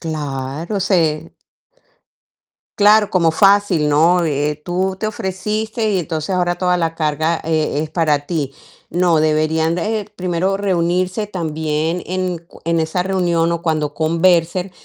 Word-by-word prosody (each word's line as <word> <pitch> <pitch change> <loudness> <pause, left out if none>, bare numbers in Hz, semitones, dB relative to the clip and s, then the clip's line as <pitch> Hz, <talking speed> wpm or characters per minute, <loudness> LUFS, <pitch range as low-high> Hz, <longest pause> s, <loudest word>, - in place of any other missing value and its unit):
Claro, 150 +3 -4
se 170 -6 0 1.4
Claro, 210 0 +5
como 170 -3 +2
fácil, 195 -4 +3
¿no? 170 +4 +3
Eh, 150 0 -1
tú 185 +2 -1
te 215 - 0
ofreciste 215 +2 -2
y 195 - +1
entonces 160 -1 -3
ahora 180 -1 +1
toda 180 0 +1
la 165 -2 -1
carga, 155 +1 0
eh, 155 -2 0
es 155 - -6
para 155 -3 +1
ti. 150 -5 -2 0.4
No, 175 0 +2
deberían, 155 +1 +1
eh, 215 +3 -1
primero 185 +1 -1
reunirse 185 +1 0
también 160 -2 -2
en 185 -1 -2
cu 170 +1 -19
en 165 0 +1
esa 160 +3 0
reunión 175 -3 +1
o 170 0 -2
cuando 155 -3 -1
conversen 170 +3 +1
170 Hz, 135 wpm, -18 LUFS, 155-185 Hz, 1.4 s, Claro